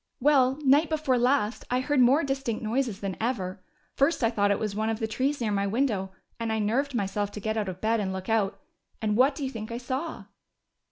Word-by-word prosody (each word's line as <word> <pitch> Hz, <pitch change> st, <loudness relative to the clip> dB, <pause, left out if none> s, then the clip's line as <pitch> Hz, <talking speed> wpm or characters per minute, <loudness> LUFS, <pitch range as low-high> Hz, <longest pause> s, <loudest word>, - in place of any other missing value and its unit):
"Well, 265 Hz, -1 st, +4 dB
night 290 Hz, +3 st, +4 dB
before 300 Hz, -5 st, +1 dB
last 245 Hz, -3 st, +1 dB
I 250 Hz, -, +1 dB
heard 285 Hz, +2 st, +1 dB
more 260 Hz, +6 st, +5 dB
distinct 270 Hz, -5 st, -2 dB
noises 230 Hz, -2 st, -1 dB
than 195 Hz, -2 st, -3 dB
ever. 200 Hz, -6 st, -2 dB, 0.3 s
First 275 Hz, 0 st, +1 dB
I 230 Hz, -, +3 dB
thought 205 Hz, -3 st, +2 dB
it 200 Hz, -, +2 dB
was 210 Hz, -2 st, -3 dB
one 220 Hz, +1 st, 0 dB
of 225 Hz, -, -1 dB
the 225 Hz, -, -2 dB
trees 265 Hz, +6 st, -1 dB
near 225 Hz, -3 st, -1 dB
my 200 Hz, 0 st, 0 dB
window, 215 Hz, -4 st, 0 dB, 0.3 s
and 230 Hz, -1 st, -2 dB
I 220 Hz, -, 0 dB
nerved 245 Hz, +6 st, 0 dB
myself 205 Hz, -1 st, -1 dB
to -, -, -5 dB
get 220 Hz, +2 st, -2 dB
out 210 Hz, -3 st, -1 dB
of 185 Hz, 0 st, -8 dB
bed 225 Hz, +1 st, +2 dB
and 195 Hz, -2 st, -1 dB
look 190 Hz, 0 st, -5 dB
out. 215 Hz, -3 st, +1 dB, 0.4 s
And 210 Hz, -1 st, 0 dB
what 265 Hz, +4 st, +4 dB
do 285 Hz, -, -5 dB
you 265 Hz, -, -2 dB
think 220 Hz, -2 st, -6 dB
I 235 Hz, -, -3 dB
saw?" 260 Hz, +6 st, -4 dB
230 Hz, 230 wpm, -27 LUFS, 210-270 Hz, 0.4 s, more